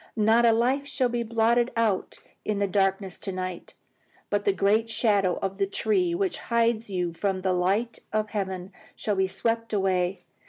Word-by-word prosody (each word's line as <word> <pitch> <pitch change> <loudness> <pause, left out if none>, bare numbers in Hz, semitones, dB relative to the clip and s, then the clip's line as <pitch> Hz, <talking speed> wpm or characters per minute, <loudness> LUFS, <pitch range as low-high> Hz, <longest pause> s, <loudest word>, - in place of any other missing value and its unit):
Not 225 +2 +4
a - - +6
life 255 +5 +1
shall 255 -3 0
be 240 0 -1
blotted 235 +1 +2
out 225 -5 0 0.3
in 210 -1 -1
the 200 - +1
darkness 195 -1 0
tonight; 185 -2 -5 0.6
but - - 0
the 405 - +4
great 220 - +2
shadow 200 -6 +2
of 195 +1 -3
the 195 - +2
tree 360 - +1
which 380 0 -1
hides 230 -1 0
you 180 -3 -2
from 190 +2 -1
the 185 0 +1
light 195 +6 0
of 215 0 -1
heaven 190 -2 -3 0.2
shall 210 - -1
be 190 0 +2
swept 230 +3 -2
away. 190 -2 0
210 Hz, 170 wpm, -26 LUFS, 190-230 Hz, 0.6 s, a